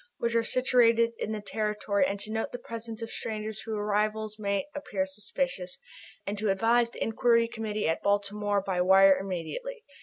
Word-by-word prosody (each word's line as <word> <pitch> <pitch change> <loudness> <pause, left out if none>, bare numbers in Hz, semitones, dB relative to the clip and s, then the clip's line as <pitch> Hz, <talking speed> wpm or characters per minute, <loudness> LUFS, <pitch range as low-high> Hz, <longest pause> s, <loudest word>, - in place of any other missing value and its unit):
which 235 0 -1
are 230 - +4
situated 235 -2 +3
in 215 - -2
their 215 -1 -4
territory 210 -2 0
and 200 - -3
to 210 - -7
note 225 0 -2
the - - -4
presence 230 -1 -7
of - - -4
all - - -12
strangers 215 -1 -4
whose 220 -1 -4
arrival 210 +1 0
may 200 -1 0
appear 205 -10 -2
suspicious, 195 0 -3 0.5
and 200 +1 -3
to 215 -1 0
advise 230 +4 +3
the - - -4
Inquiry 230 +1 +3
Committee 215 -3 -3
at 160 - 0
Baltimore 205 0 +1
by 190 -2 -1
wire 190 +1 +6
immediately. 195 - -5
215 Hz, 180 wpm, -29 LUFS, 200-230 Hz, 0.5 s, wire